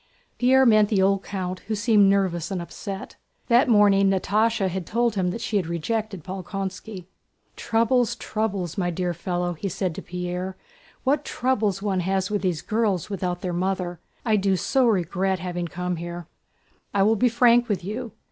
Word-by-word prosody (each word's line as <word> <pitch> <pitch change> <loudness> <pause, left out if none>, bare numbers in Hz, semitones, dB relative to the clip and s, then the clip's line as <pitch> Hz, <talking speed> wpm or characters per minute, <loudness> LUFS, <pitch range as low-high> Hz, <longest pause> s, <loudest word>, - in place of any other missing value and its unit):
Pierre 260 +2 +5
met 215 -3 +5
the 205 - +2
old 195 0 +3
count, 185 -2 -4
who 220 - -1
seemed 210 -2 +4
nervous 185 -4 +1
and 190 - -2
upset. 195 +3 -7 0.3
That 245 +4 +5
morning 200 -3 +5
Natásha 210 +2 +1
had 185 -1 -4
told 235 0 +1
him 185 -3 0
that 205 +6 -4
she 210 - 0
had 185 -5 -1
rejected 195 +2 -3
Bolkónski. 190 +1 -6 0.5
"Troubles, 230 +1 +1
troubles, 200 -5 -3
my 175 -1 0
dear 175 0 -2
fellow!" 175 +1 -2
he 195 +4 -4
said 185 0 -2
to - - -7
Pierre. 180 +1 -4 0.5
"What 280 +2 +1
troubles 220 -8 0
one 195 -3 0
has 190 +2 -1
with 205 - 0
these 180 -5 -1
girls 210 -4 0
without 180 -2 -2
their 180 -1 -3
mother! 180 -1 -2 0.3
I 220 -2 +3
do 195 -1 +2
so 250 +8 +2
regret 190 -2 +1
having 175 0 -4
come 180 +1 -3
here.... 175 +1 -6 0.7
I 195 - +4
will 220 +3 +4
be 245 +3 +3
frank 240 0 +4
with 190 -4 -1
you. 225 +2 -5
195 Hz, 175 wpm, -24 LUFS, 180-220 Hz, 0.7 s, Pierre